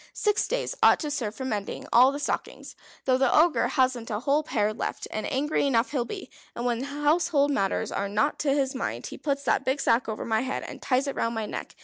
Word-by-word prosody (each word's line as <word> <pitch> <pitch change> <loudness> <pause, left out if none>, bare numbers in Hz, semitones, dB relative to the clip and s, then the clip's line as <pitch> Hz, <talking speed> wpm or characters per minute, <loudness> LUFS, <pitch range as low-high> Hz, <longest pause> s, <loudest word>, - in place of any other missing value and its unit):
Six 420 0 +1
days - - -2
ought - - +6
to 300 -2 -3
serve 225 -7 -3
for 260 - -5
mending 210 -5 -3
all 250 +3 +7
the 280 - -4
stockings, 290 - -4 0.3
though 255 -1 +3
the 265 -1 +3
Ogre 325 +1 +4
hasn't 255 -4 0
a 210 -2 -2
whole 285 +3 +2
pair 215 -8 0
left, 220 - -4
and 215 +5 -3
angry 285 +2 +1
enough 240 -3 +1
he'll 255 -5 0
be. 390 +4 -7 0.2
And 240 - -4
when 240 -1 0
household 295 +1 +1
matters 195 -8 0
are 200 0 -2
not 215 +8 0
to 285 - 0
his 275 -1 +1
mind 265 - -4
he - - -7
puts 280 -1 -2
that - - +1
big 265 +2 0
sack 230 -2 +2
over 215 - -4
my 220 -1 +1
head, 265 +1 -3
and - - -9
ties 260 +1 +1
it 275 - -2
round 230 0 -1
my 220 -1 -2
neck. - - -6
265 Hz, 235 wpm, -26 LUFS, 230-290 Hz, 0.3 s, all